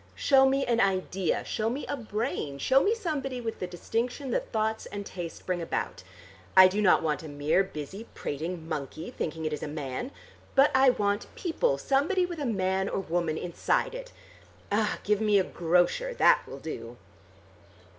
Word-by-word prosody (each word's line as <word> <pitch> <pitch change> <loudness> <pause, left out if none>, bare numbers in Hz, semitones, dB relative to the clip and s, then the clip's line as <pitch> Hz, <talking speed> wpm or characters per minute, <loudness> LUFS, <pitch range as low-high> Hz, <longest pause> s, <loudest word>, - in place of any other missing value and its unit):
Show 270 -1 +5
me 270 +1 +1
an 235 -1 +1
idea: 190 -2 0
show 220 0 -1
me 265 +5 -3
a - - -2
brain, 215 - -3
show 265 - +4
me 430 +8 +2
somebody 280 - -3
with 225 -2 -4
the 180 - -3
distinction 235 - -3
that - - -2
thoughts 220 0 -1
and 205 0 -6
taste 175 -4 -7
bring 180 -2 -1
about. 95 - -3 0.6
I 185 0 +11
do 200 +3 -1
not 185 -5 +5
want 150 -2 0
a 160 - -8
mere 145 +5 +1
busy 190 +5 -7
prating 160 +3 -4
monkey 155 +1 -5
thinking 160 0 -4
it 155 - -1
is 150 - -4
a - - -3
man. 145 - -4 0.5
But 275 +2 +6
I 265 0 +6
want 205 -4 0
people: 370 +8 0
somebody 330 +8 +2
with 345 -2 -6
a 285 - -1
man 190 -2 0
or - - -1
woman 170 -3 -1
inside 180 - 0
it. - - -7 0.6
Ah! 210 +1 +1
give 210 0 +1
me 210 -2 +4
a 190 - +4
grocer. 180 - +1
That - - +4
will - - -8
do!" - - -7
205 Hz, 180 wpm, -28 LUFS, 170-265 Hz, 0.6 s, I